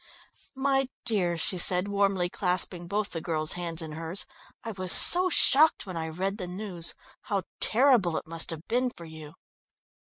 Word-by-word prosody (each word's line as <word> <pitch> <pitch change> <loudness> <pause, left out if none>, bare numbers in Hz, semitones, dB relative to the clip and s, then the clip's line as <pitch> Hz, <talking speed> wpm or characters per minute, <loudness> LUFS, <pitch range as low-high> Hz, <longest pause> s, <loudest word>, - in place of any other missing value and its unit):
"My 270 -1 -1 0.2
dear," 185 -7 -1
she 180 +2 +1
said, 180 +2 +3
warmly 200 -3 -1
clasping 180 -1 -2
both 205 +2 -3
the 165 - -4
girl's 155 -2 0
hands 170 -2 -3
in 160 - -9
hers, 165 +4 -4 0.4
"I 230 - -6
was 185 -3 -1
so 365 +1 +6
shocked 310 -2 +5
when 185 -3 -9
I 160 -1 -5
read 190 +6 -4
the 180 - -6
news! 180 -2 -4 0.3
How 200 -2 -3 0.2
terrible 230 - +2
it - - -7
must 165 0 -3
have 165 -1 -8
been 250 +2 -1
for 170 -8 -14
you." 160 -1 -13
180 Hz, 175 wpm, -26 LUFS, 165-215 Hz, 0.4 s, so